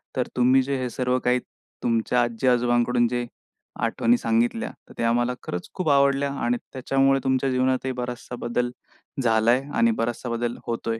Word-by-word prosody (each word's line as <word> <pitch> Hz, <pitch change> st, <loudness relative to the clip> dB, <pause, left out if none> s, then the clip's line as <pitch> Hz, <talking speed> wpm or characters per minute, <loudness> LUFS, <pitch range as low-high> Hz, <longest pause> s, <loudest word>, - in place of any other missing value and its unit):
तर 130 Hz, -2 st, 0 dB
तुम्ही 130 Hz, +2 st, +4 dB
जे 135 Hz, +1 st, -2 dB
हे 125 Hz, -, -2 dB
सर्व 125 Hz, +1 st, 0 dB
काही 125 Hz, 0 st, +3 dB, 0.4 s
तुमच्या 115 Hz, +1 st, +1 dB
आजी-आजोबांकडून 120 Hz, 0 st, +2 dB
जे 120 Hz, 0 st, -2 dB, 0.6 s
आठवणी 235 Hz, -, +2 dB
सांगितल्या, 235 Hz, -1 st, 0 dB, 0.2 s
तर -, -, -12 dB
त्या 115 Hz, -, +1 dB
आम्हाला 120 Hz, +1 st, +1 dB
खरंच 90 Hz, -, -5 dB
खूप 180 Hz, -4 st, -1 dB
आवडल्या 140 Hz, 0 st, +3 dB
आणि 120 Hz, +1 st, +1 dB, 0.2 s
त्याच्यामुळे 135 Hz, +1 st, +2 dB
तुमच्या 130 Hz, 0 st, +1 dB
जीवनातही 130 Hz, +1 st, +1 dB
बराचसा 125 Hz, -1 st, -5 dB
बदल 120 Hz, +1 st, -1 dB, 0.5 s
झालाय 115 Hz, +2 st, +3 dB
आणि 235 Hz, 0 st, +4 dB
बराचसा 120 Hz, -, -2 dB
बदल 120 Hz, 0 st, -2 dB
होतोय. 115 Hz, -1 st, -2 dB
125 Hz, 155 wpm, -24 LUFS, 120-135 Hz, 0.6 s, तुम्ही